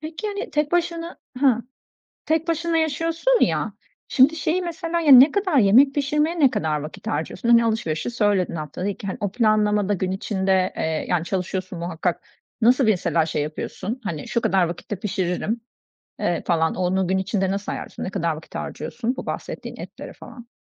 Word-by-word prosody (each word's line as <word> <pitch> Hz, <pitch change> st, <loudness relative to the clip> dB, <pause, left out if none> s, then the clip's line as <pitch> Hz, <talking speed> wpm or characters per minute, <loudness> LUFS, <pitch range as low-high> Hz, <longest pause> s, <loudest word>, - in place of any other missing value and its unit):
Peki, 320 Hz, +7 st, -6 dB
hani, 405 Hz, 0 st, -4 dB
tek 300 Hz, +1 st, 0 dB
başına 340 Hz, 0 st, -1 dB, 0.2 s
Ha, 245 Hz, -4 st, +3 dB, 0.6 s
tek 320 Hz, +1 st, 0 dB
başına 335 Hz, 0 st, 0 dB
yaşıyorsun 330 Hz, -, +1 dB
ya, -, -, +1 dB, 0.4 s
şimdi, 275 Hz, +5 st, +4 dB
şeyi 340 Hz, +3 st, 0 dB
mesela 340 Hz, 0 st, -2 dB
ya, 300 Hz, -4 st, +5 dB
ne 265 Hz, +4 st, +10 dB
kadar 375 Hz, -8 st, +1 dB
yemek 250 Hz, +7 st, +6 dB
pişirmeye 300 Hz, +4 st, 0 dB
ne 275 Hz, -, +6 dB
kadar 155 Hz, -6 st, -1 dB
vakit 150 Hz, +2 st, -9 dB
harcıyorsun? 160 Hz, +10 st, -3 dB
Hani, 235 Hz, 0 st, +6 dB
alışverişi 220 Hz, -4 st, -1 dB
söyledin 205 Hz, -6 st, +1 dB
haftada 155 Hz, +6 st, -4 dB
2, 200 Hz, 0 st, -5 dB
hani, 190 Hz, -, -3 dB
o 205 Hz, -2 st, -1 dB
planlamada 210 Hz, -3 st, +2 dB
gün 185 Hz, 0 st, -2 dB
içinde, 190 Hz, -1 st, 0 dB
eee, 160 Hz, -1 st, -2 dB
yani, 175 Hz, -2 st, +1 dB
çalışıyorsun 185 Hz, -1 st, -3 dB
muhakkak. 170 Hz, 0 st, -2 dB, 0.4 s
Nasıl 250 Hz, +3 st, +4 dB
mesela 175 Hz, -6 st, +2 dB
şey 150 Hz, -2 st, -1 dB
yapıyorsun, 190 Hz, -, -5 dB
hani, 160 Hz, -6 st, -4 dB
şu 235 Hz, -, 0 dB
kadar 190 Hz, -3 st, +2 dB
vakitte 175 Hz, +4 st, -5 dB
pişiririm, 200 Hz, +3 st, -2 dB, 0.6 s
eee, 175 Hz, -, -1 dB
falan 160 Hz, -2 st, +2 dB
onu 185 Hz, +1 st, 0 dB
gün 190 Hz, +1 st, +1 dB
içinde 190 Hz, 0 st, 0 dB
nasıl 200 Hz, +1 st, -3 dB
ayarlıyorsun, -, -, -6 dB
ne -, -, -3 dB
kadar 170 Hz, -3 st, -1 dB
vakit 155 Hz, -, -13 dB
harcıyorsun 245 Hz, +2 st, -4 dB
bu -, -, -6 dB
bahsettiğin -, -, -5 dB
etlere -, -, -9 dB
falan? 240 Hz, -2 st, -12 dB
215 Hz, 170 wpm, -23 LUFS, 185-300 Hz, 0.6 s, ne